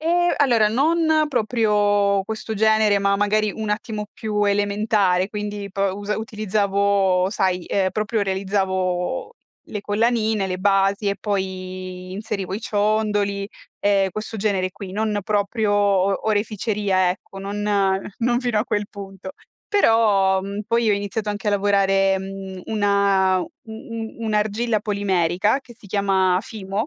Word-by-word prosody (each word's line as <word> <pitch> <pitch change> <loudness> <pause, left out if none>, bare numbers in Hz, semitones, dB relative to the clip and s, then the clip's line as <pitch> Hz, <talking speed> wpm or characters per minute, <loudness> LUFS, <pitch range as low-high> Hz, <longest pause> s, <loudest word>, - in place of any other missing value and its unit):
E, 350 +2 +2
allora 235 -7 +4
non 315 +5 +2
proprio 205 -5 +2
questo 220 +2 -5
genere, 215 -1 +3
ma 200 0 +2
magari 210 +1 +1
un 220 -1 -5
attimo 210 0 -3
più 210 -1 -1
elementare, 205 -2 +1
quindi 205 -1 -5
p 195 - -12 0.4
utilizzavo, 200 -3 +1
sai, 185 -3 0
ehm, 190 -2 +1
proprio 215 +1 -1
realizzavo 190 - -1 0.4
le 210 - -4
collanine, 220 -1 +1
le 185 -1 -3
basi 195 +1 +2
e 200 - -1
poi 185 -2 -4
inserivo 195 -2 -4
i 215 - -4
ciondoli, 205 -2 0 0.3
e 195 -1 +3
questo 215 +2 -5
genere 195 -3 0
qui, 195 -1 -9
non 210 0 -1
proprio 210 +1 0
o 200 0 +2
oreficeria, 205 -3 +1
ecco, 195 +1 -8
non 200 +1 -4 0.6
non 240 +1 +1
fino 245 -4 0
a - - -1
quel 205 -3 -1
punto. 195 -1 -9 0.3
Però 210 - +3
mhmm, 200 +2 -5
poi 230 -1 +2
ho - - +4
iniziato 205 +2 -3
anche 205 0 -2
a - - +3
lavorare 195 -1 +2
mhmm, 190 -1 -7
una 200 -3 +2
u - - -5 0.2
u 225 0 -7
un'argilla 215 +1 0
polimerica 200 +1 +1
che 245 -3 -15
si 205 - -16
chiama 190 -2 +2
FIMO. 205 -1 -4
205 Hz, 135 wpm, -22 LUFS, 195-215 Hz, 0.6 s, allora